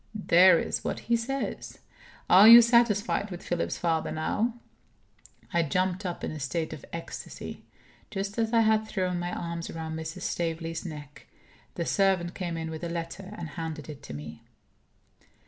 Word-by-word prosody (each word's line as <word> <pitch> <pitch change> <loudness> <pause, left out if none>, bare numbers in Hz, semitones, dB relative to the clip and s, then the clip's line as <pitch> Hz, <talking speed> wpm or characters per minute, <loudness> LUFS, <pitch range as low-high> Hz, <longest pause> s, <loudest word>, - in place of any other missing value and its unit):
There 185 -3 +6
is - - -2
what - - -3
he 235 - +1
says. 265 +4 -4 0.5
Are 195 +4 +8
you 235 +1 +11
satisfied 230 -3 +2
with 180 -2 -8
Philip's 175 -1 -2
father, 165 -2 0
now?" 215 +9 -1 1.0
I 170 - +3
jumped 185 +5 0
up 175 - -6
in - - -2
a 155 - -6
state 155 +4 -2
of 155 - -9
ecstasy. 165 0 -7 0.4
Just 200 +2 -4
as 225 -1 +1
I 230 -1 +4
had 220 0 +2
thrown 185 -4 -1
my 175 0 -3
arms 170 -1 -4
round 160 -1 -5
Mrs. 160 -1 -6
Staveley's 165 -1 -3
neck, 145 -3 -10 0.5
the 170 - -2
servant 190 -3 +1
came 175 -3 -4
in 160 0 -4
with 160 +1 -7
a 170 - -2
letter, 175 +4 -6
and 170 -2 -6
handed 160 -1 -6
it 145 -2 -8
to - - -9
me. 75 +1 -9
175 Hz, 165 wpm, -28 LUFS, 160-200 Hz, 1.0 s, you